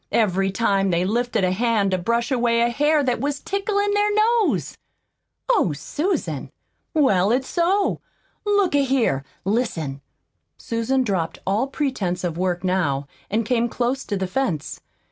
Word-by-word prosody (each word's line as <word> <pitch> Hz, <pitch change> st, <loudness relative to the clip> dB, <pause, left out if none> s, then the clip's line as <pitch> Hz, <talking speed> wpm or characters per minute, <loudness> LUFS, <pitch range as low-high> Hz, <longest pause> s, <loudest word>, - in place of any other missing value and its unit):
every 195 Hz, -3 st, +2 dB
time 195 Hz, -2 st, +1 dB
they 175 Hz, 0 st, +1 dB
lifted 235 Hz, +1 st, 0 dB
a 180 Hz, -, +2 dB
hand 215 Hz, -1 st, +1 dB
to 185 Hz, -, +2 dB
brush 235 Hz, +7 st, 0 dB
away 235 Hz, -2 st, +2 dB
a 235 Hz, 0 st, +2 dB
hair 295 Hz, +3 st, +2 dB
that 250 Hz, -2 st, 0 dB
was 285 Hz, 0 st, -2 dB
ticklin' 405 Hz, +1 st, -1 dB
their 415 Hz, 0 st, +2 dB
nose?" 445 Hz, +1 st, +2 dB, 0.7 s
"Oh, 425 Hz, -, +2 dB
Susan!" 305 Hz, -, -2 dB, 0.5 s
"Well, 205 Hz, -, +3 dB
it's 260 Hz, +2 st, +1 dB
so. 380 Hz, +4 st, +1 dB, 0.4 s
Look 405 Hz, -4 st, +2 dB
a 285 Hz, -1 st, +4 dB
here, 250 Hz, -, +1 dB, 0.2 s
listen!" 170 Hz, -, -1 dB, 0.6 s
Susan 235 Hz, +3 st, 0 dB
dropped 185 Hz, -8 st, -1 dB
all 210 Hz, +7 st, +1 dB
pretense 255 Hz, -, -2 dB
of 170 Hz, -3 st, -2 dB
work 180 Hz, 0 st, -1 dB
now, 170 Hz, -7 st, 0 dB, 0.2 s
and 220 Hz, +2 st, 0 dB
came 235 Hz, 0 st, +1 dB
close 250 Hz, +3 st, -1 dB
to 205 Hz, -, -2 dB
the 190 Hz, -, -1 dB
fence. 185 Hz, -, -2 dB
235 Hz, 150 wpm, -22 LUFS, 185-280 Hz, 0.7 s, a